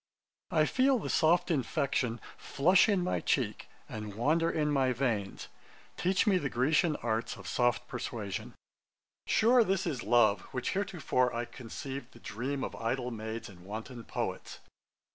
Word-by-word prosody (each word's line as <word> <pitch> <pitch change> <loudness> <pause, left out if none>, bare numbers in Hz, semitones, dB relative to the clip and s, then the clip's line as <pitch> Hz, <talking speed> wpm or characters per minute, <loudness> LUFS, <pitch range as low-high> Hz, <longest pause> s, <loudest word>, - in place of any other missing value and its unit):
'_I 155 -3 +3
feel 265 0 +3
the - - -3
soft 175 +3 +3
infection 130 -5 0 0.2
Flush 180 +9 +3
in 195 -4 +2
my 180 - 0
cheek, 120 -6 -1 0.2
and 105 -2 -6
wander 155 +8 +2
in 150 -2 0
my 135 -3 +2
veins. 115 -6 -2 0.5
Teach 185 +1 +1
me 195 -4 +4
the 140 - -2
Grecian 150 +6 +2
arts 115 0 -1
of - - -10
soft 120 -1 +1
persuasion.' 115 -5 -5 0.7
'Sure 235 +2 +5
this 195 -2 0
is 145 -8 -2
love, 110 -6 +4
which 125 -1 -2
heretofore 175 -10 0
I 120 +1 -1
conceived 130 +2 -7
the 120 - -15
dream 130 +6 -4
of - - -4
idle 125 +2 -2
maids, 110 0 -5
and 90 -3 -14
wanton 110 +5 -7
poets.' - - -4
130 Hz, 150 wpm, -31 LUFS, 115-165 Hz, 0.7 s, Sure